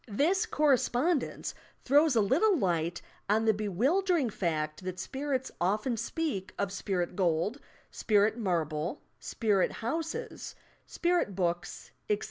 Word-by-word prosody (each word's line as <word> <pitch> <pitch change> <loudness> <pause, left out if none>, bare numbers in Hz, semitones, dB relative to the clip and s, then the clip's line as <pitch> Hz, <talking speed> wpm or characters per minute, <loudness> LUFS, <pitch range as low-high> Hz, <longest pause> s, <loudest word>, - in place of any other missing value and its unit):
This 340 - +1
correspondence 290 - +1 0.3
throws 290 +1 +4
a 225 - +5
little 335 - +3
light 170 - -1 0.3
on 220 +2 +3
the 220 - +5
bewildering 260 - +1
fact 155 -3 -2
that 185 0 -4
spirits 265 +5 -3
often 210 +7 +1
speak 230 - -3
of 200 -1 -1
spirit 185 -3 -2
gold, 180 - 0 0.3
spirit 210 0 +2
marble, 170 - -2 0.2
spirit 205 -5 +1
housea, 325 - -4 0.3
spirit 345 - 0
books, 175 -1 -2 0.2
etc. 210 -1 +2
215 Hz, 115 wpm, -30 LUFS, 185-290 Hz, 0.3 s, a